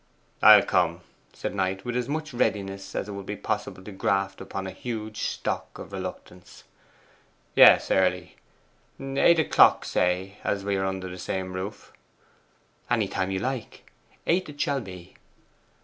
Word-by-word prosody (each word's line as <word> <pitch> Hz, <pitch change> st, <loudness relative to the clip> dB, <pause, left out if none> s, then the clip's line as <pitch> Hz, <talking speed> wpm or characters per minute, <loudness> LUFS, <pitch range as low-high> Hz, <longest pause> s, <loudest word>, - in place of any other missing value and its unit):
'I'll -, -, +9 dB
come,' 85 Hz, -1 st, +1 dB, 0.3 s
said -, -, -5 dB
Knight, 95 Hz, -1 st, -2 dB
with 120 Hz, 0 st, -3 dB
as 125 Hz, 0 st, -1 dB
much 155 Hz, 0 st, -3 dB
readiness 100 Hz, -4 st, -2 dB
as -, -, -2 dB
it -, -, -6 dB
was 100 Hz, -1 st, -7 dB, 0.2 s
possible 95 Hz, -, -3 dB
to 105 Hz, -, -9 dB
graft 95 Hz, 0 st, -1 dB
upon 95 Hz, -1 st, -5 dB
a 95 Hz, -, -5 dB
huge 110 Hz, +1 st, -6 dB
stock -, -, -3 dB
of -, -, -10 dB
reluctance. 90 Hz, 0 st, -8 dB, 0.9 s
'Yes, -, -, +7 dB
early; 90 Hz, -2 st, +1 dB, 0.6 s
eight 135 Hz, +5 st, +3 dB
o'clock 160 Hz, -, +5 dB
say, 90 Hz, +3 st, -1 dB
as 100 Hz, -1 st, -2 dB
we 100 Hz, -1 st, 0 dB
are 95 Hz, 0 st, 0 dB
under 95 Hz, -1 st, -4 dB
the 90 Hz, 0 st, -8 dB
same 95 Hz, 0 st, -4 dB
roof.' 95 Hz, +3 st, -7 dB, 1.0 s
'Any -, -, +1 dB
time 95 Hz, -, -2 dB
you 95 Hz, -, -1 dB
like. 125 Hz, +3 st, -5 dB, 0.3 s
Eight 180 Hz, 0 st, +1 dB
it 145 Hz, -1 st, -12 dB
shall 140 Hz, -2 st, 0 dB
be. 90 Hz, -5 st, -11 dB
95 Hz, 150 wpm, -26 LUFS, 95-120 Hz, 1.0 s, I'll